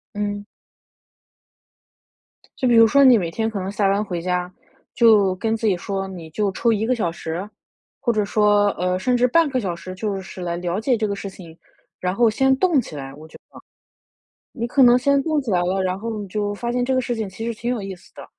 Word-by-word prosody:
嗯。 205 0 -3 2.1
就 265 -3 0
比 240 - +4
如 230 0 +8
说 280 +5 +4
你 255 -3 +7
每 170 -4 -2
天 225 +3 -1
可 210 - -4
能 190 +1 -4
下 200 -1 +1
班 200 +2 +1
回 180 -5 -4
家， 180 0 -2 0.4
就 210 -5 +4
跟 220 +4 -1
自 225 - -4
己 200 -4 +3
说： 195 +2 -4
“你 175 -4 -9
就 200 +4 -1
抽 230 +5 +1
1 220 0 0
个 255 - +1
小 175 -8 -1
时。” 170 +3 -5 0.5
或 240 - 0
者 215 -2 0
说， 205 0 +3
呃， 180 0 -1
甚 250 +6 +1
至 245 0 +3
半 325 +3 +3
个 260 - -1
小 185 -4 -2
时 185 +2 -9
就 200 0 -3
是 185 0 -10
来 170 -1 -3
了 175 +1 -3
解 245 +1 +1
这 215 -1 -1
个 200 - -2
事 195 0 -6
情。 170 -4 -13 0.4
然 180 0 -1
后 230 +3 +3
先 265 +4 +2
动 340 -3 +3
起 160 - -10
来， 135 -1 -7
我 155 +2 -13
觉 - - -14
得。 - - -14 0.9
你 235 -3 -3
可 270 +2 +2
能 245 0 +7
先 280 +2 +2
动 310 -2 0
起 260 - -6
来 180 -2 +2
了， 190 +2 0
然 185 0 -1
后 225 0 -4
你 205 - -6
就 205 +1 -2
发 235 +3 -3
现 245 0 0
这 260 +1 0
个 - - +3
事 240 -1 -3
情 220 -2 -3
其 205 +4 -7
实 235 - -2
挺 235 - -3
有 230 - -4
意 195 -1 -6
思 180 - -22
的， - - -11
205 Hz, 255 characters per minute, -21 LUFS, 185-235 Hz, 2.1 s, 如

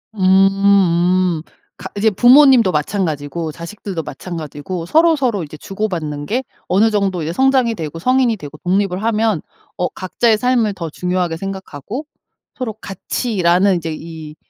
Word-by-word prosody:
음음. 185 -3 +3 0.4
가 - - -8
이제 215 +1 +3
부모님도 245 -2 +6
마찬가지고 155 -1 -2
자식들도 170 +2 -6
마찬가지고 165 +2 -6
서로 325 - +4
서로 240 - -1
이제 155 0 -9
주고받는 165 -7 -4
게 250 +4 -1 0.2
어느 210 +5 +3
정도 195 -5 0
이제 165 +2 -3
성장이 265 -1 +3
되고 160 -4 -6
성인이 250 +3 +2
되고 150 -2 -10
독립을 190 +1 0
하면 220 -5 +1 0.4
어 180 - 0
각자의 215 +4 0
삶을 235 -3 +1
더 170 -4 -5
중요하게 180 -1 -2
생각하고 195 - -6 0.5
서로 245 -4 -4
같이라는 195 -2 0
이제 165 -1 -4
이 160 -2 -9
190 Hz, 325 characters per minute, -18 LUFS, 165-220 Hz, 0.5 s, 부모님도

